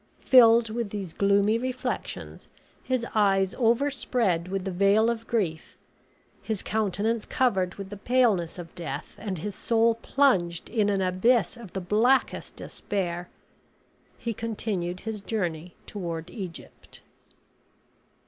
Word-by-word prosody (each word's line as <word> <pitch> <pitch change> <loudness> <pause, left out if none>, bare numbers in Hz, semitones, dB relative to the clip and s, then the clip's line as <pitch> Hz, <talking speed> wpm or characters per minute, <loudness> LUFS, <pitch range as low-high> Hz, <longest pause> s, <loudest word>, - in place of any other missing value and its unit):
Filled 230 -3 +7
with 230 -1 -2
these 195 -5 -5
gloomy 200 +2 +3
reflections, 255 +1 -4 0.4
his 255 -2 -1
eyes 195 -3 +3
overspread 235 -7 +1
with 195 0 -3
the 190 - -2
veil 200 +5 +4
of 230 -1 -6
grief, 180 -9 -2 0.6
his 220 -4 -3
countenance 215 +1 0
covered 190 -8 +1
with 195 0 -8
the 205 - -6
paleness 210 -7 +2
of 170 -2 -9
death, 155 -4 -6
and 195 -4 -4
his 205 +6 -4
soul 230 +3 +2
plunged 225 -8 +1
in 210 -3 +1
an 200 -1 +1
abyss 190 +7 +2
of 230 -6 -11
the 190 - -3
blackest 225 +9 +1
despair, 175 -3 -4 0.9
he 235 - -3
continued 200 -5 -3
his 220 -2 -5
journey 175 -6 -3
toward 170 -4 -5
Egypt. 180 -4 -9
205 Hz, 125 wpm, -27 LUFS, 180-230 Hz, 0.9 s, Filled